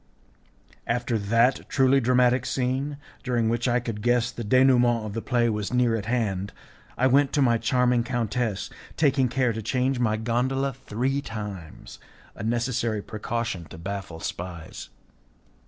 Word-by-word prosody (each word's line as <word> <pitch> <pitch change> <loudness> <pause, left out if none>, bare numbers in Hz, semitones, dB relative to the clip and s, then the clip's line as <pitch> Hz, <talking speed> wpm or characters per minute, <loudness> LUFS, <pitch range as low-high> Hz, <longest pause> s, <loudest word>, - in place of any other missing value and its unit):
After 120 0 0
that 115 +5 +2
truly 135 0 +4
dramatic 125 0 +3
scene, 135 +3 -1 0.2
during 120 -4 0
which 120 +2 0
I 120 0 +2
could 115 -3 -5
guess 120 +1 +2
that - - -25
the 105 - -6
denouement 125 -3 +4
of 105 - -5
the 115 - -3
play 120 -1 +1
was 105 -3 -2
near 125 -2 +2
at 110 -1 -4
hand, 100 -5 -1 0.4
I 130 - +2
went 135 +2 +4
to 145 - +2
my 120 -2 +3
charming 125 +1 +2
countess, 120 -3 -2 0.3
taking 135 -3 +3
care 125 -1 +1
to 110 - -4
change 130 +3 0
my 110 -3 +1
gondola 130 +4 0
three 130 +3 -2
times 105 - -8 0.3
a - - -10
necessary 115 -1 -1
precaution 110 -4 -4
to 80 - -11
baffle 90 -2 -6
spies. 85 -1 -6
120 Hz, 155 wpm, -25 LUFS, 110-125 Hz, 0.4 s, truly